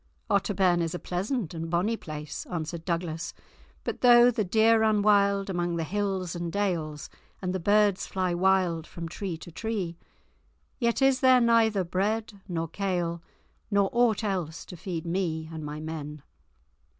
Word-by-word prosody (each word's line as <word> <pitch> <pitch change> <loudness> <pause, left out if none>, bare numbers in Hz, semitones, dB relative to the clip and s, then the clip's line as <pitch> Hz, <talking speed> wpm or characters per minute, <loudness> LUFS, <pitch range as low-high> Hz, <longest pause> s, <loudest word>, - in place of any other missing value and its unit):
"Otterbourne 190 -3 +2
is 165 +1 -2
a - - -1
pleasant 185 - -3
and 165 -1 -4
a - - -5
bonny 180 +7 +1
place," 150 -6 -7
answered 165 -1 -5
Douglas; 170 -1 -3 0.5
"but - - -4
though 245 0 +7
the 220 -2 0
deer 220 +4 +4
run 215 -2 +3
wild 200 -1 +3
among 175 -2 -1
the 165 - -1
hills 190 -1 -2
and 170 -1 -3
dales, 165 -7 -2 0.3
and 180 -1 -2
the 190 - -1
birds 205 +1 +3
fly 185 -2 -1
wild 180 -2 +2
from 170 -1 -7
tree 175 0 -5
to 170 - -11
tree, 185 -3 -3 0.8
yet 235 +1 +1
is 270 -1 +4
there 260 -1 +6
neither 225 -4 +3
bread 205 +4 -2
nor 165 -3 -2
kale 175 -2 -2 0.5
nor 200 -2 +2
aught 235 -3 +3
else 180 -6 -3
to - - -9
feed 170 -1 -5
me 165 -3 -2
and 160 -1 -6
my 150 0 -5
men. 150 -2 -6
185 Hz, 160 wpm, -27 LUFS, 165-205 Hz, 0.8 s, though